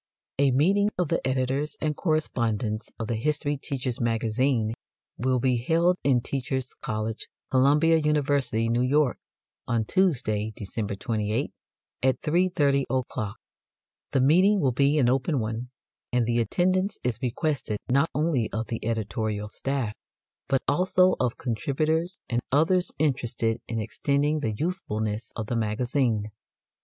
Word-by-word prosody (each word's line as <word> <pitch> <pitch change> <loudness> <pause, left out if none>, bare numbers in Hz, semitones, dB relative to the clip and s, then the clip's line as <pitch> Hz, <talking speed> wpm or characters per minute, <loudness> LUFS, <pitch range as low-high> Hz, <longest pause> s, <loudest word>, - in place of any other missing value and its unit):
A 140 -1 +5
meeting 190 +11 +3
of 180 -4 0
the - - +1
editors 130 +3 -1
and 155 -1 -1
correspondents 115 - -1
of 115 - -3
THE 115 - -1
HISTORY 145 +3 0
TEACHER'S 130 -4 -3
MAGAZINE 115 0 +1 0.5
will 130 +1 +2
be 125 0 +2
held 165 +9 +2
in 130 -4 +3
Teachers' 130 0 -3
College, 110 +1 -4 0.2
Columbia 150 +5 +4
University, 145 -6 +1
New 120 +1 +1
York, 135 +1 +2 0.5
on 115 -2 +1
Tuesday, 110 - +1
December 100 0 -4
28, 110 -1 -1 0.5
at 130 0 +2
3.30 150 -5 +2
o'clock. 125 -5 -2 0.7
The 135 - +2
meeting 185 +9 +5
will 135 -7 +2
be 140 +4 +2
an 130 -5 +4
open 135 +3 +1
one, 115 +2 -3 0.4
and 125 -1 +2
the 120 +1 +1
attendance 185 - +1
is 120 -3 -1
requested 130 -3 -1
not 140 +6 +3
only 150 -7 +1
of 110 0 -2
the 115 - -4
editorial 110 -1 -2
staff, 130 -2 -2 0.5
but 135 -1 +1
also 185 +4 +3
of 125 -2 0
contributors 155 - -1
and 120 0 0
others 170 +6 +3
interested 120 -6 0
in 115 - -3
extending 140 +7 0
the 115 -7 -1
usefulness 110 - -2
of 110 - -3
the 120 - -3
Magazine. 115 0 0
130 Hz, 135 wpm, -26 LUFS, 115-150 Hz, 0.7 s, A